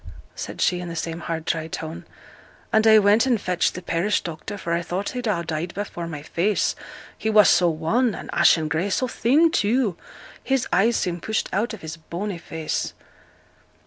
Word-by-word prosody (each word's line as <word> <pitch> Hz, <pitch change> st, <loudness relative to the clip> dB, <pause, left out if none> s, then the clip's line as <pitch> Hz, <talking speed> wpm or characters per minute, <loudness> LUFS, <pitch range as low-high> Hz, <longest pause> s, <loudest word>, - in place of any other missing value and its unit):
said -, -, -6 dB
she, 180 Hz, -, +2 dB
in 175 Hz, -, -6 dB
the 170 Hz, -, -6 dB
same 165 Hz, 0 st, -3 dB
hard, 165 Hz, -1 st, -4 dB
dry 160 Hz, -1 st, -1 dB
tone. 160 Hz, 0 st, -6 dB, 0.7 s
'And 220 Hz, 0 st, +4 dB
I 220 Hz, 0 st, +8 dB
went 210 Hz, +4 st, +4 dB
and 240 Hz, -4 st, +2 dB
fetched 180 Hz, -3 st, 0 dB
th' 180 Hz, -, -7 dB
parish 185 Hz, +5 st, +1 dB
doctor, 175 Hz, +5 st, -6 dB
for 170 Hz, -3 st, -3 dB
I 170 Hz, -, +1 dB
thought 180 Hz, +3 st, -3 dB
he'd 250 Hz, -2 st, -4 dB
ha' 180 Hz, -5 st, 0 dB
died 160 Hz, +2 st, -3 dB
before 180 Hz, -4 st, -4 dB
my 150 Hz, -3 st, -6 dB
face, 190 Hz, +6 st, 0 dB, 0.4 s
he 220 Hz, -, -2 dB
was 210 Hz, -2 st, +6 dB
so 175 Hz, -1 st, +4 dB
wan, 195 Hz, +9 st, +1 dB
and -, -, -8 dB
ashen 160 Hz, -2 st, +4 dB
grey, 160 Hz, +6 st, -1 dB
so 255 Hz, +6 st, 0 dB
thin, 290 Hz, +8 st, +3 dB
too, 220 Hz, -, +1 dB, 0.5 s
his 270 Hz, -1 st, 0 dB
eyes 220 Hz, +6 st, +4 dB
seem 175 Hz, -1 st, -1 dB
pushed 220 Hz, +3 st, -1 dB
out 220 Hz, +4 st, 0 dB
of 210 Hz, -, -15 dB
his 160 Hz, +1 st, -7 dB
bony 175 Hz, +4 st, -5 dB
face.' 160 Hz, -2 st, -4 dB
180 Hz, 190 wpm, -23 LUFS, 165-220 Hz, 0.7 s, I